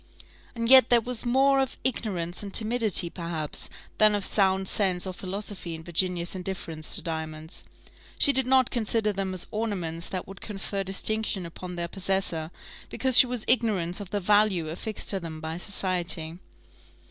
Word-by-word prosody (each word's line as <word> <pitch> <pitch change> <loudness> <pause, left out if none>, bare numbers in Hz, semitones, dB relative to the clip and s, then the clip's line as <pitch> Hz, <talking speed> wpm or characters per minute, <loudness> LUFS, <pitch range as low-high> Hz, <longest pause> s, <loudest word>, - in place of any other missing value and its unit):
And 230 0 -2
yet 260 -1 +8
there 240 - +6
was 240 +1 -5
more 270 +2 +4
of 265 -1 -1
ignorance 185 -9 -2
and 200 -1 -6
timidity, 220 -4 +3
perhaps, 165 -3 -5 0.3
than 215 -1 +6
of 200 -2 -1
sound 190 -1 +2
sense 185 -3 +1
or 185 - -4
philosophy 190 -2 -5
in 160 - -9
Virginia's 175 +1 -1
indifference 175 -4 -3
to - - +3
diamonds; 160 -1 -5 0.5
she 285 - +5
did 265 -2 +1
not 260 -1 +4
consider 220 -2 0
them 195 -1 -2
as 180 - -3
ornaments 180 -7 -3
that 185 -2 -4
would 195 -1 -11
confer 200 -1 -4
distinction 195 0 -2
upon 180 +2 -8
their 170 0 -2
possessor, 185 -4 0 0.4
because 260 -2 0
she 255 - +9
was 245 -3 -3
ignorant 200 -8 +1
of 200 -3 -7
the 205 - -1
value 200 -4 +3
affixed 210 +6 -3
to 195 - -1
them 165 -3 -7
by 160 +1 -5
society. 180 -4 0
195 Hz, 165 wpm, -26 LUFS, 170-220 Hz, 0.5 s, she